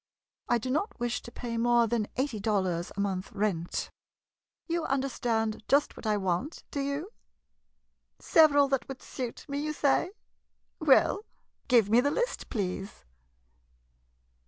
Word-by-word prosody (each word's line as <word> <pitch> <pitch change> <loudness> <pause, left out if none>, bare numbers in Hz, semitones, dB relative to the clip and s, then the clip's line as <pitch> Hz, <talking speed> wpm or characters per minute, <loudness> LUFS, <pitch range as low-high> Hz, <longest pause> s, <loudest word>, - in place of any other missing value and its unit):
I 240 - +4
do 255 +3 -3
not 305 +6 -1
wish 240 0 -1
to 235 - -11
pay 235 -1 -5
more 240 0 +4
than 225 -2 0
eighty 260 -4 -1
dollars 190 -5 0
a - - -3
month 195 -2 -2
rent. 195 -5 -2 0.7
You 340 -1 -1
understand 240 -5 -1
just 285 +1 +3
what - - -7
I 210 -1 +2
want, 190 - -2
do 285 - -3
you? 280 +8 -3 1.1
Several 290 -3 +5
that 270 -2 0
would 270 -1 -8
suit 250 -3 -6
me— 280 0 -3
■ - - -3
you 305 0 -2
say? 290 +4 +2 0.7
Well, 310 +7 +4 0.4
give 230 -6 +4
me 235 +2 +6
the 285 - +2
list, 485 +11 -2
please. 195 - -4
240 Hz, 145 wpm, -29 LUFS, 210-280 Hz, 1.1 s, me